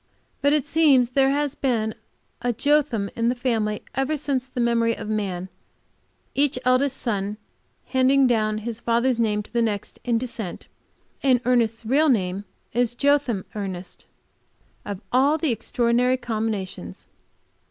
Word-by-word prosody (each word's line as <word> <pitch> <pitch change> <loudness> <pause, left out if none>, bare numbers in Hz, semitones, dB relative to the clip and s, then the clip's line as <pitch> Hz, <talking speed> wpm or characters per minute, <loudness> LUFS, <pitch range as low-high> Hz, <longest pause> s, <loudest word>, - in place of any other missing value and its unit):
But 285 +1 +3
it 295 -2 +2
seems 290 -6 +4
there 270 +1 +3
has 285 0 0
been 230 -6 0 0.5
a 245 0 +1
Jotham 260 -5 +1
in 230 0 +1
the 245 - 0
family 225 -4 -1
ever 270 +3 0
since 270 -3 -2
the 255 - -6
memory 230 -1 +2
of 220 - -6
man, 195 -4 -2 0.9
each 285 -2 +2
eldest 255 +2 +2
son 205 -3 -2 0.5
handing 265 +1 +3
down 215 -3 +1
his 235 -1 -3
father's 235 +1 +1
name 210 -2 +1
to - - -17
the 235 - +2
next 210 -3 -2
in 240 -2 +1
descent, 225 -6 -5 0.5
and 260 -3 +4
Ernest's 230 -2 +1
real 290 +7 +3
name 195 -4 0 0.3
is 240 0 +1
Jotham 280 -8 +1
Ernest 190 -3 -6 0.8
of 205 -1 -5
all 275 +5 +4
the 315 -4 0
extraordinary 240 +2 +1
combinations! 220 -5 -4
240 Hz, 140 wpm, -24 LUFS, 215-265 Hz, 0.9 s, seems